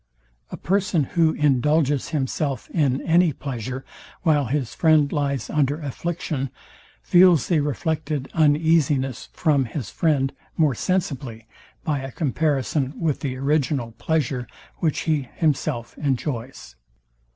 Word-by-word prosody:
A - - -7
person, 190 -4 +1
who 165 -2 +3
indulges 145 0 +2
himself 140 -3 -2
in 140 -5 +1
any 170 0 +4
pleasure, 130 -2 -5 0.4
while 150 -5 +3
his 130 0 -2
friend 155 -3 +3
lies 140 -5 -1
under 145 0 0
affliction, 150 -1 -3 0.5
feels 175 -5 +5
the 170 -4 +3
reflected 150 -1 -2
uneasiness 150 -4 +2
from 145 -4 +2
his 120 -2 -5
friend 140 -5 +1 0.2
more 155 -4 +3
sensibly 135 - -2 0.4
by 150 -5 0
a 135 0 -6
comparison 145 -1 -1
with 155 -4 0
the 135 -4 -3
original 135 -3 0
pleasure, 125 +1 -1 0.3
which 160 -3 0
he 150 -6 -1
himself 145 -6 -1
enjoys. 130 - -3
145 Hz, 120 wpm, -23 LUFS, 130-160 Hz, 0.5 s, feels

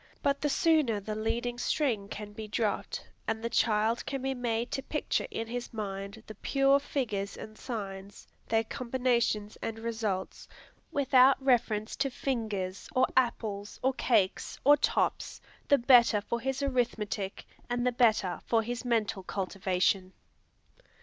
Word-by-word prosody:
But 280 0 +1
the 295 - +1
sooner 295 -8 +3
the 215 +2 -5
leading 235 +3 -2
string 240 -9 0
can 205 0 -7
be 215 0 -7
dropped, 210 -1 -2 0.2
and 220 0 -2
the 235 - -2
child 220 +1 +2
can 275 -2 -3
be 270 0 0
made 240 -2 -2
to 270 - -2
picture 300 +2 -1
in 225 - -3
his 240 +1 -5
mind 200 0 -5
the 215 - -8
pure 275 +4 +3
figures 215 -8 -3
and 215 0 -9
signs, 200 -5 -7 0.2
their 225 0 +2
combinations 235 -3 -1
and 225 -1 -3
results, 220 -4 -3 0.4
without 270 -1 +5
reference 240 -5 +1
to 275 0 +1
fingers, 215 -8 -3
or 255 - +5
apples, 215 -5 0
or 265 +1 +3
cakes, 210 -7 +1
or 290 +1 +8
tops, 290 - 0 0.3
the 285 - +6
better 240 -3 +6
for 235 +3 -3
his 270 +3 -2
arithmetic, 225 -7 -1 0.2
and 245 0 0
the 250 - +3
better 220 -8 +2
for 225 -1 +3
his 240 +1 -4
mental 225 -4 0
cultivation. 190 0 0
230 Hz, 145 wpm, -30 LUFS, 210-255 Hz, 0.4 s, or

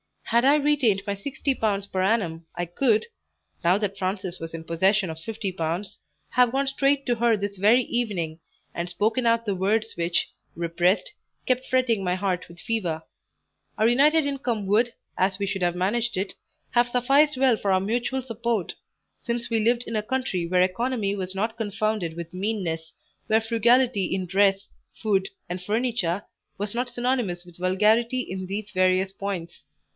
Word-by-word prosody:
Had 235 +2 +2
I 280 +2 +6
retained 280 -9 +2
my 200 - -1
60l. 205 -3 -1
per 185 - 0
annum 180 -6 0
I 175 0 -2
could, 220 +5 +2 0.6
now 180 +3 +5
that 200 -2 -2
Frances 185 -1 -3
was 165 0 -7
in 165 -1 -6
possession 190 +4 +2
of 160 - -8
50l., 185 -1 -4 0.3
have 250 -1 +3
gone 275 +1 +1
straight 275 +1 +1
to 245 - +1
her 235 0 +3
this 200 0 -4
very 220 +6 +5
evening, 190 -11 -2 0.3
and 170 +1 -3
spoken 220 +7 0
out 230 0 +2
the 205 - 0
words 210 +4 0
which, 170 0 +1 0.3
repressed, 175 +3 +1 0.3
kept 255 0 0
fretting 245 -6 +2
my 180 -1 +1
heart 185 -2 -1
with 170 0 -13
fever; 180 -9 -2 0.7
our 220 - +4
united 295 +5 +4
income 255 -7 -2
would, 230 +4 +3 0.2
as 190 0 +2
we 200 - -1
should 195 -1 -3
have 175 -1 +1
managed 225 +6 0
it, 190 +1 -2 0.4
have 240 0 +3
sufficed 270 +4 +3
well 255 -3 +4
for 200 - 0
our 185 0 +3
mutual 240 +6 -1
support; 230 -5 -2 0.5
since 235 0 -3
we 230 -1 +2
lived 235 +2 +2
in 225 - -2
a - - +1
country 215 -7 -2
where 180 +1 +3
economy 205 +2 0
was 190 -1 -4
not 220 +3 -1
confounded 215 -5 -1
with 170 0 -7
meanness, 180 -5 -3 0.3
where 220 +1 +3
frugality 235 -1 +3
in 190 -1 -2
dress, 195 +2 +2 0.3
food, 195 -3 +1 0.2
and 180 +1 -4
furniture, 210 -3 0 0.3
was 205 0 -3
not 245 +1 -1
synonymous 240 -8 -1
with 175 -1 -15
vulgarity 215 +7 +2
in 190 -5 -5
these 205 +2 -4
various 185 0 +2
points. 195 -4 -5
205 Hz, 170 wpm, -25 LUFS, 185-240 Hz, 0.7 s, I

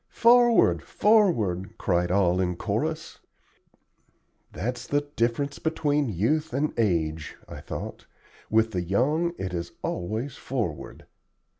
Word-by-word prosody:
"Forward! 240 0 +5
forward!" 120 - +2
cried 90 0 0
all 90 -1 +2
in 90 -1 -1
chorus. - - -3 1.3
"That's 125 +2 -4
the 145 0 +1
difference 120 +5 -1
between 150 -3 0
youth 150 - 0
and 150 +2 0
age," 80 -8 -1
I - - -9
thought. - - -7 0.4
"With 110 +1 +3
the 90 -4 -1
young 145 - +1
it 95 -1 -4
is 85 -1 -4
always 110 +9 -3
'forward.'" 115 - -4
115 Hz, 115 wpm, -26 LUFS, 90-150 Hz, 1.3 s, Forward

